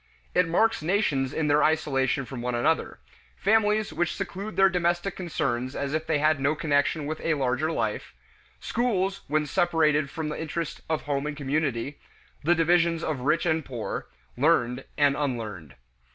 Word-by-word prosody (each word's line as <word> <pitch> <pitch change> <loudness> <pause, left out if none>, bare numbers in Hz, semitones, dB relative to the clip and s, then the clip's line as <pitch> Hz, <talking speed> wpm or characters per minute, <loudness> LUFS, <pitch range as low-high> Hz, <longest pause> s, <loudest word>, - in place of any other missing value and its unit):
It 180 -2 +3
marks 225 +6 +2
nations 155 -7 +1
in 155 0 -1
their 145 +1 +4
isolation 140 -4 +1
from 125 0 -7
one 125 0 -2
another; 140 +7 0 0.4
families 215 0 +2
which 175 -1 -1
seclude 195 +2 -5
their 195 0 +6
domestic 175 +1 0
concerns 140 -8 -2
as 140 0 -3
if 160 0 -2
they 160 -2 +2
had 155 0 +2
no 140 +3 +1
connection 145 0 +1
with 155 +2 -4
a 160 - +1
larger 135 +3 0
life; 110 - -3 0.4
schools 195 -5 -1
when 150 +1 +1
separated 155 -3 +2
from 155 +1 -4
the 150 - -4
interest 165 0 -4
of 160 -1 -1
home 145 0 -1
and 150 -1 -5
community; 140 -2 -1 0.4
the 170 +4 +4
divisions 165 0 +2
of 155 -4 -2
rich 155 +7 +1
and 160 -2 +1
poor; 125 -5 -5 0.3
learned 125 -3 +2
and 145 -1 +4
unlearned. 110 - -4
155 Hz, 165 wpm, -26 LUFS, 140-170 Hz, 0.4 s, their